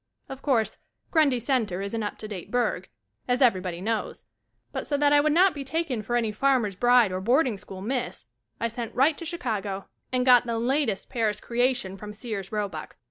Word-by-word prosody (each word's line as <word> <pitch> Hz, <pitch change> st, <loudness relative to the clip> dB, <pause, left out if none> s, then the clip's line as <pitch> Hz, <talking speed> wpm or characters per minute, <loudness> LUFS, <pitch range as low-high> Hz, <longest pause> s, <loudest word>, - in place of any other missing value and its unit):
Of 270 Hz, 0 st, -7 dB
course, 225 Hz, -7 st, +1 dB, 0.3 s
Grundy 295 Hz, -6 st, +3 dB
Center 225 Hz, -7 st, 0 dB
is 200 Hz, +2 st, -4 dB
an 225 Hz, -, -1 dB
up 205 Hz, -, -4 dB
to 215 Hz, -, -7 dB
date 190 Hz, -3 st, -7 dB
burg, 220 Hz, -6 st, -1 dB, 0.4 s
as 245 Hz, 0 st, +1 dB
everybody 185 Hz, -9 st, +2 dB
knows, 215 Hz, -, -3 dB, 0.5 s
but -, -, -4 dB
so 285 Hz, -, +1 dB
that 290 Hz, 0 st, +4 dB
I 290 Hz, -, +7 dB
would 305 Hz, +1 st, +2 dB
not 365 Hz, +4 st, +5 dB
be 285 Hz, -, -5 dB
taken 275 Hz, -4 st, -2 dB
for 240 Hz, +3 st, -2 dB
any 230 Hz, -3 st, +1 dB
farmer's 235 Hz, -3 st, +1 dB
bride 240 Hz, -1 st, +4 dB
or 185 Hz, 0 st, -3 dB
boarding 245 Hz, +3 st, +3 dB
school 190 Hz, -1 st, -10 dB
Miss, 245 Hz, -, -3 dB, 0.3 s
I 230 Hz, -, +1 dB
sent 230 Hz, 0 st, -6 dB
right 285 Hz, +4 st, +4 dB
to 335 Hz, -, -6 dB
Chicago 215 Hz, -, -3 dB, 0.3 s
and 250 Hz, -1 st, +1 dB
got 245 Hz, -1 st, +6 dB
the 230 Hz, -1 st, -1 dB
latest 240 Hz, -3 st, 0 dB
Paris 225 Hz, -4 st, 0 dB
creation 245 Hz, -5 st, 0 dB
from 210 Hz, +1 st, -8 dB
Sears 210 Hz, -3 st, -5 dB
Robuck. 200 Hz, -7 st, -4 dB
235 Hz, 195 wpm, -26 LUFS, 205-265 Hz, 0.5 s, I